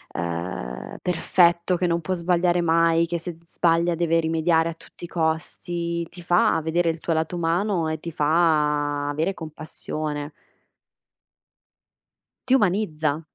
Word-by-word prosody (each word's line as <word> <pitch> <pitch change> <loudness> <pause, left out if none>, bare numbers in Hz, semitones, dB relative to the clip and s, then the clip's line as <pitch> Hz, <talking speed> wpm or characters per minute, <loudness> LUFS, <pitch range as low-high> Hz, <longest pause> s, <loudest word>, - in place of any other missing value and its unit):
ehm, 85 -8 -4
perfetto, 175 0 +2
che 180 - 0
non 170 0 0
può 175 +4 -2
sbagliare 175 0 +1
mai, 165 0 +3
che 170 0 -2
se 170 0 -5
d 165 - -24
sbaglia 170 0 +2
deve 165 0 +2
rimediare 165 0 +2
a - - -4
tutti 165 - -16
i - - -8
costi, 170 +1 -2
ti 175 - -12
fa 175 -1 +3
vedere 165 +2 +1
il 165 0 -2
tuo 165 - -1
lato 160 +2 -1
umano 170 +1 0
e 155 -1 -3
ti 170 - -6
fa 150 -2 +1
avere 155 +6 -1
compassione. 155 -1 -5 2.2
Ti 260 - +5
umanizza. 165 - +1
165 Hz, 140 wpm, -24 LUFS, 155-175 Hz, 2.2 s, Ti